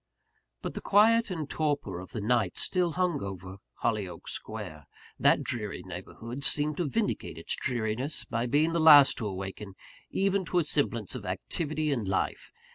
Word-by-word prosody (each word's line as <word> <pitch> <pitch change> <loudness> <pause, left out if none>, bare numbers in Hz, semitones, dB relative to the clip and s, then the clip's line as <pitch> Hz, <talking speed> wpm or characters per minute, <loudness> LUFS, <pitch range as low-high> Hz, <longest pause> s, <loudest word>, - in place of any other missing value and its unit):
But - - -4
the - - -5
quiet 225 +3 +4
and 160 -6 -3
torpor 145 - -1
of 90 - -9
the 110 - -5
night 110 -3 +1
still 180 -3 +1
hung 180 -5 0
over 95 -1 -7 0.3
Hollyoake 105 -6 -2
Square. 75 -2 -6 0.3
That - - +4
dreary 105 -4 -3
neighbourhood 110 +8 -7
seemed 150 +1 +1
to 170 -5 -1
vindicate - - -2
its - - 0
dreariness 120 +3 -2
by 115 +1 -2
being 155 +6 +2
the 170 - +1
last 145 -3 +8
to 110 - -2
awaken 95 +1 -6 0.3
even 195 0 +1
to 180 - -1
a 175 - +4
semblance 120 - 0
of - - -6
activity 155 -1 -2
and 115 -8 -1
life. 95 - -1
130 Hz, 165 wpm, -29 LUFS, 100-155 Hz, 0.3 s, last